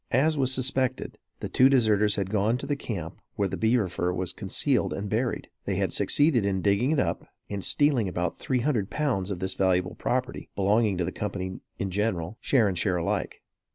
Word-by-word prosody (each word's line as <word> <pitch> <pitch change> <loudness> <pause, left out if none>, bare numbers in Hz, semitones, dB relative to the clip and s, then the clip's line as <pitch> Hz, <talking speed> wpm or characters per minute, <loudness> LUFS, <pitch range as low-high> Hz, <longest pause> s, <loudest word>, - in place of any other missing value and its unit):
As 155 +5 +3
was 130 -3 +2
suspected, 130 0 -1 0.2
the - - -2
two 130 +1 +5
deserters 105 -5 +3
had 100 -1 -2
gone 110 +3 +2
to 140 - -6
the 145 +1 -1
camp 90 - -6
where 100 - +1
the - - -4
beaver 110 -2 +2
fur 90 0 -1
was 90 -1 -2
concealed - - 0
and 100 +1 -4
buried. 115 +4 -1 0.2
They - - -1
had - - 0
succeeded 145 -6 +3
in 95 -2 -1
digging 100 +6 +2
it 155 -2 +2
up - - -1 0.2
and 100 -2 -3
stealing 140 -9 +2
about 90 -1 -2
three 130 -2 -1
hundred 115 -7 0
pounds 125 -11 -1
of 100 - -3
this 95 +1 -2
valuable 90 -1 +1
property, 130 +1 -2
belonging 100 0 +2
to 90 - 0
the 90 - -3
company 95 -2 -4 0.2
in 95 -1 -3
general, 100 -1 -2
share 120 -6 +3
and 95 - -1
share 90 +1 +1
alike. 85 - -2
105 Hz, 200 wpm, -27 LUFS, 95-130 Hz, 0.2 s, two